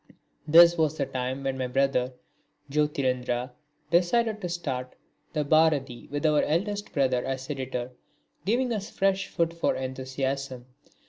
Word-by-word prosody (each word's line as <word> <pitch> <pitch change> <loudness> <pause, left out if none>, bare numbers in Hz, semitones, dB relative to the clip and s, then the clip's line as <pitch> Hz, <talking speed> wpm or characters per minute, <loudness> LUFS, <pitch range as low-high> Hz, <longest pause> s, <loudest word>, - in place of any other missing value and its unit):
This 170 +2 +7
was 155 -1 +1
the - - 0
time 130 +1 -3
when 135 -1 -2
my 130 - -1
brother 130 -1 +1 0.6
Jyotirindra 130 -4 0 0.4
decided 215 +6 +2
to 180 - -3
start 130 -7 -4 0.4
the 150 -2 0
Bharati 145 -5 +2
with 145 +2 -2
our 150 -1 +4
eldest 205 +6 -1
brother 130 -3 +1
as 135 +2 -4
editor, 130 -3 -4 0.5
giving 240 +4 +1
us 205 -2 -4
fresh 195 0 +1
food 170 0 0
for 170 - 0
enthusiasm. 130 0 -3
140 Hz, 135 wpm, -27 LUFS, 130-170 Hz, 0.6 s, This